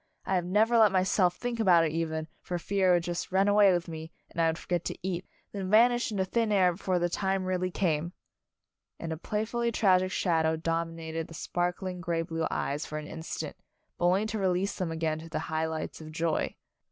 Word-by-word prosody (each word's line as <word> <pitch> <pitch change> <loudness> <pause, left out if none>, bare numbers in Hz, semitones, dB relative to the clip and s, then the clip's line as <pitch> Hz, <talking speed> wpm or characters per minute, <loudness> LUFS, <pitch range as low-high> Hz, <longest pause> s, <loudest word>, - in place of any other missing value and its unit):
I - - -1
have 180 -2 +1
never 220 +6 +3
let 215 -3 +6
myself 185 -1 +2
think 240 -1 -4
about 175 -6 +5
it 155 - -1
even, 160 -1 -2
for 175 - -3
fear 190 +1 +1
it 180 - +6
would 175 - +1
just 175 +1 -4
run 190 +2 +3
away 205 -1 +6
with 175 0 0
me, 160 0 -7 0.2
and 170 - -1
I 165 - +4
would 160 0 0
forget 175 -1 -2
to - - -3
eat, 180 -1 -3 0.2
then 195 -2 -4
vanish 240 +3 +4
into 195 -3 0
thin 225 +2 0
air 185 -3 +4
before 185 +1 -1
the 175 0 +1
time 190 +1 -1
really 185 0 0
camel" 170 -3 0 0.9
And 165 -1 -4
a - - -5
playfully 225 +6 -1
tragic 185 -4 +3
shadow 160 -4 +1
dominated 165 0 -3
the 165 - -11
sparkling 180 +3 -2
gray 170 -1 -1
blue 165 -1 -2
eyes 145 +2 -2
for 155 - -5
an 155 - -5
instant, 160 +2 -6 0.4
but 175 - +1
only 185 +4 +3
to 220 0 -3
release 190 +1 +1
them 185 -4 -2
again 160 -1 -1
to 165 +1 -10
the - - -3
high 160 0 -1
lights 160 0 -5
of 155 0 -9
joy. 165 0 -1
175 Hz, 215 wpm, -29 LUFS, 165-195 Hz, 0.9 s, let